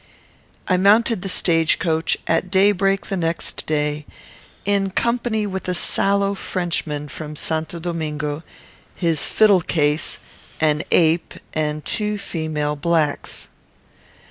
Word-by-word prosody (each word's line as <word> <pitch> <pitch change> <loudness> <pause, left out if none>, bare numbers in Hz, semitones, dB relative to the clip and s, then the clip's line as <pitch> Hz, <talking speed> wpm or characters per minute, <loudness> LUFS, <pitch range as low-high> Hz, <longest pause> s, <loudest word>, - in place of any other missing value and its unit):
I 185 - +3
mounted 210 +2 +4
the 195 - -4
stage 165 -3 +4
coach 160 -2 0
at 165 +3 0
daybreak 195 0 +3
the 195 - -3
next 165 -1 -2
day, 150 -1 -1 0.6
in 200 -1 +1
company 235 +1 0
with 190 -2 -4
a 180 - 0
sallow 200 +2 +1
Frenchman 170 -6 -3
from 150 +2 -7
St. 160 +1 -1
Domingo, 155 -3 -4 0.5
his 165 -4 +1
fiddle 205 -4 +5
case, 150 -2 0 0.4
an 150 -1 +2
ape, 165 0 +2 0.2
and 150 -1 -2
two 210 -1 0
female 155 -5 -3
blacks. 155 -1 -1
170 Hz, 115 wpm, -21 LUFS, 155-195 Hz, 0.6 s, fiddle